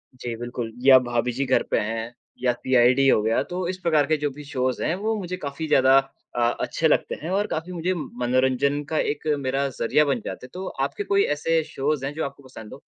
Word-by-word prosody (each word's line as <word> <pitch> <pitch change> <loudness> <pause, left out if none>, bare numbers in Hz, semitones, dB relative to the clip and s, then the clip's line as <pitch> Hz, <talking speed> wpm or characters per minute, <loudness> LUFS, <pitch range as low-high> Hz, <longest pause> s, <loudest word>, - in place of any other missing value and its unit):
जी, 120 -2 -5
बिल्कुल 120 0 -5
या 135 -1 +9
भाभी 120 +1 0
जी 135 +3 -2
घर 130 0 +2
पे - - +3
हैं 115 +2 -3 0.3
या 125 - +4
सीआईडी 130 +2 +3
हो 120 - +5
गया, 110 +1 +2
तो 180 0 -4
इस 185 +1 -3
प्रकार 155 -4 +3
के 155 +1 +2
जो 145 0 -1
भी 145 +2 -10
शोज़ 130 -3 -2
हैं, - - +1
वो 220 +3 -1
मुझे 185 -1 -4
काफ़ी 150 0 -5
ज़्यादा 135 -2 +5 0.4
अ, - - -1 0.2
अच्छे - - +1
लगते - - +1
हैं 160 - -5
और 200 +2 +1
काफ़ी 165 +3 -4
मुझे 175 +2 -1
मनोरंजन 130 -1 0
का 160 - -1
एक 150 +2 -2 0.2
मेरा 135 +2 0
ज़रिया 150 +6 +3
बन 140 - 0
जाते - - -6
हैं। - - -13
तो 185 +1 -6 0.2
आपके 140 +8 -4
कोई 200 0 +2
ऐसे 165 +2 +1
शोज़ 145 -1 -2
हैं, 140 - -3
जो 160 - -3
आपको 140 0 -8
पसंद 115 -5 -11
हो? - - -12
140 Hz, 225 wpm, -24 LUFS, 125-160 Hz, 0.4 s, या